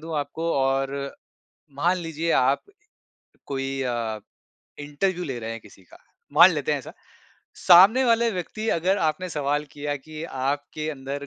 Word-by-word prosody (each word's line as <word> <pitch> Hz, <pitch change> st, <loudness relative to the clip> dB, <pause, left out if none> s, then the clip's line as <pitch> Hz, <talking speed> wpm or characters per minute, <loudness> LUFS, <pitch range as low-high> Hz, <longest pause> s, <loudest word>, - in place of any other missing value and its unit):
दूँ 160 Hz, 0 st, -5 dB
आपको 160 Hz, +4 st, -3 dB
और, 135 Hz, +1 st, -1 dB, 0.6 s
मान 175 Hz, +5 st, +2 dB
लीजिए 165 Hz, -1 st, -3 dB
आप, 135 Hz, +2 st, +2 dB, 0.8 s
कोई 135 Hz, 0 st, -3 dB
अ, 115 Hz, -3 st, -2 dB, 0.6 s
इंटरव्यू 175 Hz, +5 st, -2 dB
ले 130 Hz, -5 st, -4 dB
रहे 115 Hz, -1 st, -6 dB
हैं 115 Hz, 0 st, -6 dB
किसी 100 Hz, -2 st, -18 dB
का, 90 Hz, -, -18 dB, 0.3 s
मान -, -, +8 dB
लेते -, -, -1 dB
हैं -, -, 0 dB
ऐसा। -, -, -10 dB, 0.7 s
सामने 195 Hz, +9 st, +8 dB
वाले 235 Hz, -1 st, +3 dB
व्यक्ति 215 Hz, +4 st, -4 dB
अगर 190 Hz, +4 st, +1 dB
आपने 160 Hz, +4 st, -1 dB
सवाल 145 Hz, -1 st, -1 dB
किया 145 Hz, 0 st, -3 dB
कि 155 Hz, +3 st, -10 dB
आपके 145 Hz, +2 st, -3 dB
अंदर 140 Hz, 0 st, -6 dB
145 Hz, 150 wpm, -24 LUFS, 135-170 Hz, 0.8 s, मान